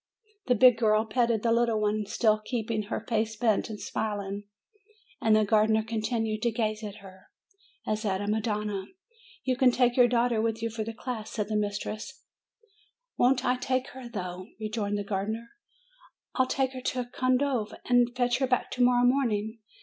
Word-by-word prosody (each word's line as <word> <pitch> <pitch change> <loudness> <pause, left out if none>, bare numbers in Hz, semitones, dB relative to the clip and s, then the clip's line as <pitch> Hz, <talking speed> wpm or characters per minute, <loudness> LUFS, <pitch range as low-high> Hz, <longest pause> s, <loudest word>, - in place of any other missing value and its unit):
The 250 - +4
big 250 0 +6
girl 215 -1 +3
petted 230 -1 +1
the 230 - +2
little 230 -1 +2
one, 210 0 0
still 215 -1 +2
keeping 225 -2 -2
her - - -3
308 - - -14
MAY 225 - +2
face 220 0 -8
bent, 220 -2 +1
and 215 -1 -6
smiling, 205 -1 -3 0.8
and 220 -1 +4
the 215 0 +4
gardener 220 +1 +3
continued 220 0 -2
to 235 - +2
gaze 215 -1 -2
at 210 0 -7
her, 190 0 -14 0.6
as 215 0 -1
at 190 -3 0
a 205 - -3
madonna. 210 -2 -1 0.6
'You 260 -1 +1
can 260 0 +5
take 245 0 +2
your 245 -2 +6
daughter 240 -1 +2
with 225 0 -1
you 230 - -1
for 220 0 -3
the 225 +1 -5
day," 240 0 -5
said 210 -1 -4
the 215 - -1
mistress. 210 +4 -3 0.9
"Won't 255 +1 +3
I 250 0 +2
take 255 0 -1
her, 255 -2 -9
though!" 185 -4 -6
rejoined 215 -1 -2
the 205 - -2
gardener. 215 +4 -3 0.9
"Fll 260 -1 +2
take 265 -1 0
her 255 - -6
to 250 0 -2
Condove, 255 -2 0
and 245 -1 +4
fetch 245 0 +1
her 265 - +1
back 250 -1 0
to 250 - -2
morrow 245 0 +4
morning. 230 -4 +1
225 Hz, 185 wpm, -28 LUFS, 215-245 Hz, 0.9 s, big